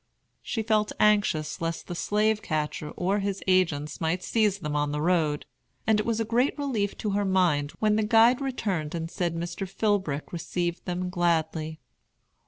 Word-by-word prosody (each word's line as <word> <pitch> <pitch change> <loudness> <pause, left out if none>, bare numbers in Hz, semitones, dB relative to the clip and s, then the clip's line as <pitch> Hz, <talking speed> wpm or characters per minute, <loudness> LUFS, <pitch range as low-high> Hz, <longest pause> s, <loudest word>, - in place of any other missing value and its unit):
She 225 - -3
felt 215 -1 +1
anxious 205 -9 +2
lest 165 0 -3
the 175 - -5
slave 210 +4 +1
catcher 150 -1 -2
or 195 +3 +1
his 200 -1 -3
agents 165 -6 +1
might 170 +3 0
seize 215 -4 +2
them 150 -6 -4
on 145 0 0
the 150 - -2
road, 155 -3 +1 0.4
and 220 -1 +3
it 215 - -2
was 230 -1 0
a 225 - 0
great 245 +7 +1
relief 235 -9 -1
to 210 - -2
her 205 +1 +1
mind 175 -7 +2
when 215 -1 +2
the 220 - +2
guide 230 +4 +5
returned 195 - -2
and 165 0 -4
said 170 -2 -1
Mr. 175 +3 -4
Philbrick 190 -9 -1
received 175 0 -3
them 180 0 -2
gladly. 160 -2 0
185 Hz, 175 wpm, -27 LUFS, 160-210 Hz, 0.4 s, guide